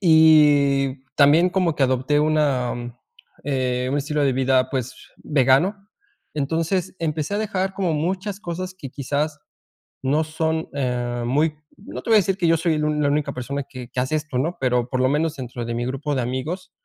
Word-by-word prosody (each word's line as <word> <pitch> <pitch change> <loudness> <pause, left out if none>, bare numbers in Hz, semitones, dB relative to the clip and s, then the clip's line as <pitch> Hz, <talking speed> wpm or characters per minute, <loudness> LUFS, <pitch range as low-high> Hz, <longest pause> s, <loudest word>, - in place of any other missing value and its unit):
y 145 -5 +5
también 150 +5 +5
como 180 -3 +1
que 145 - -1
adopté 130 +3 +1
una 150 -5 +1 0.7
eh, 130 -2 -1
un 140 - 0
estilo 150 +1 -1
de 135 - +2
vida, 130 0 +2
pues, 130 -2 -3 0.2
vegano, 140 +7 +2 0.6
entonces, 165 +6 -1
empecé 155 +3 -2
a - - 0
dejar 195 -3 -2
como 185 -5 0
muchas 190 +6 -2
cosas 185 0 -5
que 140 -8 -8
quizás 145 +3 -2 0.6
no 145 +4 +1
son, 160 +1 -2
eh, 120 -3 -2
muy 150 +5 +1 0.2
no 200 - -8
te - - -7
voy 225 - +6
a - - +8
decir 195 -1 0
que 175 -4 +1
yo 165 0 +4
soy 165 0 +1
el 150 - -1 0.2
la 145 - +2
única 150 -1 -1
persona 140 +3 -4
que 130 -2 -8
que 130 - -3
hace 130 +5 0
esto, 155 -4 -3
¿no? 165 +7 -1
Pero, 125 -2 +1
por 130 - -1
lo 130 - +3
menos, 155 +2 0
dentro 125 -2 -6
de 115 - -3
mi 120 +1 -2
grupo 135 +3 -2
de 130 - 0
amigos 130 +10 -4
150 Hz, 190 wpm, -22 LUFS, 130-165 Hz, 0.7 s, a